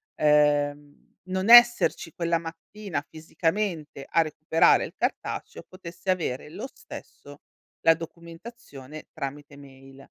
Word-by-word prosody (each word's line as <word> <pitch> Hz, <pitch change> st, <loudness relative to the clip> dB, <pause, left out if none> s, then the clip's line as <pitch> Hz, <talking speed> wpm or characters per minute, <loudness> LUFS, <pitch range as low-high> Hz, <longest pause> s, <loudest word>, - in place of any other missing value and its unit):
ehm, 145 Hz, -1 st, +1 dB
non 190 Hz, +3 st, -2 dB
esserci 240 Hz, -8 st, +6 dB
quella 170 Hz, -1 st, 0 dB
mattina 170 Hz, +5 st, -7 dB
fisicamente 165 Hz, -2 st, -3 dB
a 165 Hz, -, +3 dB
recuperare 155 Hz, +1 st, +2 dB
il -, -, -11 dB
cartaceo, -, -, -4 dB
potesse 185 Hz, 0 st, -10 dB
avere 150 Hz, -6 st, -3 dB
lo 195 Hz, +10 st, -7 dB
stesso 145 Hz, 0 st, -12 dB, 0.4 s
la 165 Hz, -, +6 dB
documentazione 165 Hz, -, -11 dB
tramite 145 Hz, +1 st, -7 dB
mail. 135 Hz, -1 st, -15 dB
165 Hz, 105 wpm, -26 LUFS, 145-185 Hz, 0.4 s, esserci